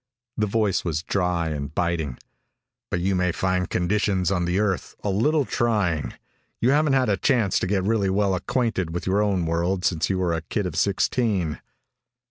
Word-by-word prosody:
The 105 - 0
voice 105 -2 +1
was 80 -2 -2
dry 90 -4 0
and 75 -1 -5
biting. 80 -7 -1 0.7
"But 85 - -1
you 95 +2 +1
may 90 -1 +1
find 90 0 -1
conditions 95 0 +1
on 90 -3 +1
the 90 +2 0
Earth 105 -3 -1
a 100 - 0
little 145 +9 +2
trying. 95 - 0 0.4
You 125 - +3
haven't 150 0 +3
had 130 -1 +3
a 100 -2 +2
chance 115 -8 +2
to - - -2
get 95 -1 0
really 100 -1 +1
well 100 0 +1
acquainted 95 -3 -1
with 85 - -3
your 95 +2 +2
own 100 -4 +1
world 85 +3 0
since 85 -2 +1
you 95 - 0
were 90 -2 0
a 80 - -1
kid 100 +5 -3
of 90 -4 -4
sixteen." 95 -1 0
95 Hz, 185 wpm, -24 LUFS, 85-105 Hz, 0.7 s, You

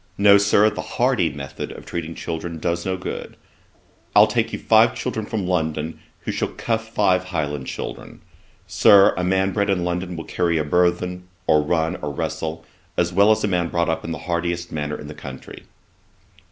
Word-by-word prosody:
No, 100 0 +7
Sir, 100 +1 +4
the - - -5 0.2
hardy - - +2
method 70 -1 -7
of - - -10
treating 85 -1 -5
children 85 0 -5
does 85 +2 -2
no 95 0 -1
good. 90 - -6 0.8
I'll - - +9
take - - 0
you - - -3
five - - +4
children 110 -1 -3
from 105 -4 -2
London, 80 -3 -2 0.2
who - - -3
shall - - -1
cuff 115 -1 -3
five 95 -4 +2
Highland 75 -7 -3
children. - - -7 0.4
Sir, 100 -1 +6
a 90 - -2
man 95 +1 +1
bred 100 0 0
in 95 -3 +1
London 90 +1 -3
will 80 - -5
carry 85 -2 0
a 75 - +1
burthen, 90 +3 0 0.2
or 75 - +4
run, 80 +3 0
or 75 - -4
wrestle, 80 +3 -4 0.3
as 85 0 +1
well 100 +3 +5
as 110 - +3
a - - +2
man 90 -3 0
brought 85 -1 0
up 80 - -1
in 85 - -5
the 80 - -3
hardiest 85 0 -2
manner 75 -1 -3
in - - -8
the 75 - -7
country.' 65 -3 -10
85 Hz, 190 wpm, -22 LUFS, 80-95 Hz, 0.8 s, I'll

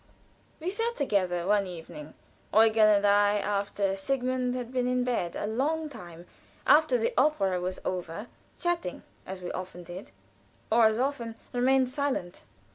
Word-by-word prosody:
We 340 +4 -2
sat 460 +3 -1
together 185 - 0
one 200 0 +2
evening 160 -3 -9 0.4
Eugen 220 0 +5
and 205 -1 +4
I, 205 0 +4
after 200 -1 -1
Sigmund 255 +4 -1
had 250 0 -5
been 250 -1 +1
in 250 0 +1
bed 230 -9 -1
a - - -3
long 300 +8 -1
time, 175 - -11 0.4
after 300 -4 +5
the 225 - 0
opera 195 -11 +2
was 185 +1 -3
over 180 +2 -4 0.3
chatting, 345 - -2 0.2
as 185 -1 -6
we 175 - -4
often 180 -1 -6
did, 175 +3 -9 0.6
or 230 0 +6
as 220 0 +3
often 250 -3 -2 0.2
remained 255 +1 +3
silent. 260 -10 -2
220 Hz, 150 wpm, -28 LUFS, 185-255 Hz, 0.6 s, or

